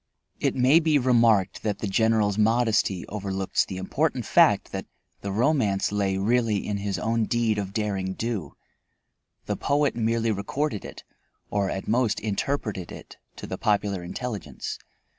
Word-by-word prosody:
It - - 0
may 130 +5 +5
be 160 -2 +3
remarked 115 -7 +3
that 105 -2 -1
the - - -4
General's 110 0 +2
modesty 110 -3 +2
overlooks 95 -2 -1
the 95 - -7
important 95 0 -1
fact - - +4
that - - -5 0.3
the 100 - -4
romance 110 -4 +1
lay 100 -2 0
really 110 0 +1
in 105 - -2
his 100 -1 -2
own 115 0 0
deed 115 -2 +1
of 100 -1 -4
derring 100 -3 -2
do; 110 -11 -3 0.9
the - - -1
poet 145 0 +1
merely 115 0 +1
recorded 105 +4 -2
it, - - -9 0.5
or 100 -2 0
at 95 - -4
most 115 -1 +1
interpreted 105 -3 -2
it - - -11 0.2
to - - -8
the 95 - -6
popular 105 -3 +1
intelligence. 95 - -5
105 Hz, 150 wpm, -25 LUFS, 100-120 Hz, 0.9 s, may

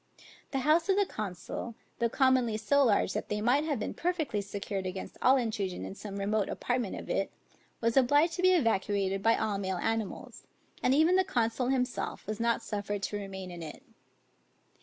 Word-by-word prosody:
The 270 -2 -1
house 325 +4 +3
of 385 - +5
the 405 - +4
consul, 215 - -5 0.2
though 235 -1 +2
commonly 260 -4 +3
so 280 +6 +3
large 210 -5 +2
that - - -4
they 210 - -1
might 250 +8 +2
have 295 -4 0
been - - -3
perfectly 325 - -1
secured 200 -1 -4
against 185 +1 -6
all 265 +2 +6
intrusion 215 -7 -2
in - - -6
some 200 0 -7
remote 205 0 0
apartment 245 -5 -2
of - - -8
it, 195 - -1 0.5
was 230 0 +1
obliged 290 +5 +4
to - - -1
be 370 0 +5
evacuated 200 - +1
by 225 +3 +4
all 210 -2 -1
male 190 -2 -2
animals, 225 +1 -3 0.3
and 260 - +3
even 325 +5 +5
the 375 - +4
consul 245 - 0
himself 250 -1 -1
was 215 +1 -4
not 235 0 +1
suffered 205 -1 -3
to 205 - -2
remain 190 -2 -7
in 175 -1 -8
it. 155 -2 -8
225 Hz, 185 wpm, -30 LUFS, 200-265 Hz, 0.5 s, all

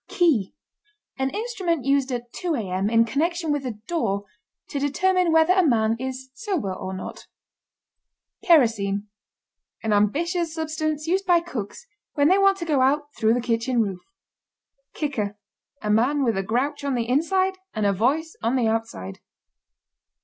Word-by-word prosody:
KEY. 290 - +2 0.7
An 265 0 +1
instrument 375 - -2
used 275 -1 +2
at 240 -1 -5
2 350 -3 -2
A.M. 195 -4 -1
in 230 0 +4
connection 325 +6 -1
with 285 -3 -1
a 245 - -3
door 205 - -1 0.4
to 280 - -3
determine 355 +5 +2
whether 320 +2 +5
a 375 - +4
man 225 -6 +2
is 260 0 -5
sober 340 - -2
or 185 0 -6
not. 185 0 -7 1.2
KEROSENE. 225 - +3 0.8
An 220 -1 +1
ambitious 320 - +1
substance 310 -1 -2
used 375 +4 0
by 350 -1 +5
cooks 335 - -6 0.3
when 290 0 +3
they 380 +2 +5
want 390 0 +4
to 340 - -4
go 295 -5 +2
out 290 +2 +1
through 220 +1 +3
the 245 - 0
kitchen 235 +1 0
roof. 195 -5 0 1.0
KICKER. 215 -9 -2 0.5
A 210 - 0
man 260 +7 +2
with 230 -3 +1
a 195 - 0
grouch 260 +9 -1
on 280 -2 0
the 235 -1 -1
inside 370 +8 +1 0.2
and 215 -1 0
a 200 - +3
voice 285 - 0
on 230 +3 +1
the 245 -3 +2
outside. 220 - -3
270 Hz, 155 wpm, -24 LUFS, 225-330 Hz, 1.2 s, whether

